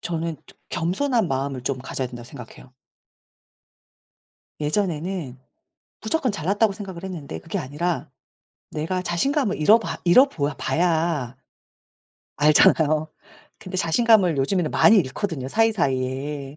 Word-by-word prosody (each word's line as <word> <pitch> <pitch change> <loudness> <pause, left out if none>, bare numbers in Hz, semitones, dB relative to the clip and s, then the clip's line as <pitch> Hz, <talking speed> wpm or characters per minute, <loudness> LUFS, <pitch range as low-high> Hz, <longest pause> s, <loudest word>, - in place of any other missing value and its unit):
저는 165 -1 -3
좀 - - -18
겸손한 195 +5 0
마음을 135 -1 -3
좀 135 -1 -2
가져야 130 0 -4
된다고 120 -1 -10
생각해요. 125 +2 -12 1.9
예전에는 160 -4 -2 0.6
무조건 250 0 -1
잘났다고 200 +4 +1
생각을 190 -3 -8
했는데 155 - -6
그게 - - -5
아니라 150 +2 -3 0.6
내가 175 +4 -2
자신감을 240 - 0
잃어 210 +10 +5
봐 - - -5
잃어 255 +11 +6
보아 145 - -3
봐야 160 -7 0 1.0
알잖아요. 155 +1 +4 0.5
근데 185 0 -7
자신감을 185 0 +3
요즘에는 155 +4 0
많이 220 -1 +5
잃거든요, 150 -2 -2
사이사이에. 140 - -1
165 Hz, 295 characters per minute, -23 LUFS, 140-195 Hz, 1.9 s, 잃어